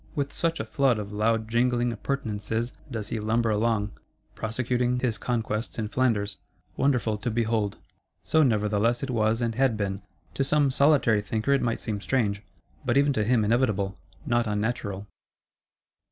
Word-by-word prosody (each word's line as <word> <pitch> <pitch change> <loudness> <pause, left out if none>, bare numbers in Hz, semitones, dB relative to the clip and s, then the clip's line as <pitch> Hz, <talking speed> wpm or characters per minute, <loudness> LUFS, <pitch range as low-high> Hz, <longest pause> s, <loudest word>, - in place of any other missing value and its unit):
With 140 -2 -2
such 165 0 -1
a 110 - -2
flood 125 +2 +2
of 105 -1 -6
loud 110 +1 +1
jingling 120 +1 +1
appurtenances 115 -2 -3 0.2
does 110 -4 -4
he 115 - -2
lumber 110 +1 +1
along, 105 -1 +1 0.4
prosecuting 125 +2 -1
his 120 -5 -1
conquests 115 -2 -2
in 110 -2 -2
Flanders; 110 -5 0 0.4
wonderful 120 -6 +1
to 120 - -2
behold. 110 -3 0 0.5
So 160 - +3
nevertheless 110 -1 +2
it 135 - -2
was 115 0 +1
and 115 -1 0
had 125 -1 +2
been: 100 -1 -2 0.3
to 135 - 0
some 145 0 +3
solitary 140 -6 +4
thinker 110 +6 0
it 140 - +2
might 115 -1 0
seem 105 -3 -3
strange; 105 -5 0 0.4
but 120 +1 +1
even 140 0 +4
to 110 - +1
him 115 -1 +2
inevitable, 105 -4 +1 0.3
not 120 -1 +1
unnatural. 105 -2 -2
115 Hz, 155 wpm, -26 LUFS, 105-125 Hz, 0.5 s, solitary